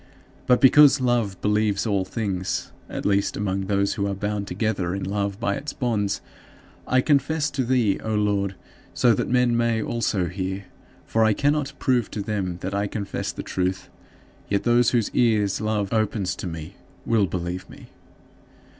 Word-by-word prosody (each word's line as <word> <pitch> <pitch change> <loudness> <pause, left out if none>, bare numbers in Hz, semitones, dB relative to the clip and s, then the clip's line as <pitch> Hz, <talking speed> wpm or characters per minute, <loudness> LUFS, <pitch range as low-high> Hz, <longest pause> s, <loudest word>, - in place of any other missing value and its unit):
But, 125 - +5
because 140 +1 +7
"love 120 -7 0
believes 105 -1 +1
all 100 -4 +1
things" 95 -3 -3 0.2
at - - -5
least 100 0 +1
among 95 -1 -2
those 100 0 +1
who 100 -1 -1
are 100 - -2
bound 105 0 -3
together 100 -6 -1
in 100 - -4
love 100 +1 -2
by 105 -4 0
its 145 +8 -5
bonds 105 -5 -1 0.7
I 130 0 +3
confess 150 +2 +1
to 135 -2 -1
thee, 120 -5 +2
O 110 -1 -1
Lord, 100 -2 0 0.4
so 120 -2 +4
that - - -1
men 125 -1 +3
may 115 -1 +1
also 110 -4 -1
hear; 95 +2 -4 0.4
for 115 - 0
if - - +5
I 110 - +3
cannot 145 +3 0
prove 125 -4 +1
to 105 - -4
them 100 -4 -2
that 95 - -4
I 100 +1 0
confess 100 -1 -4
the - - -7
truth, 95 0 -2 0.6
yet 100 0 +1
those 120 -1 +4
whose 115 -4 0
ears 105 -4 +2
love 105 -2 -1
opens 110 -3 0
to - - -5
me 80 +2 -7 0.3
will 110 -4 +2
believe 90 +1 -4
me. - - -13
105 Hz, 170 wpm, -24 LUFS, 100-120 Hz, 0.7 s, because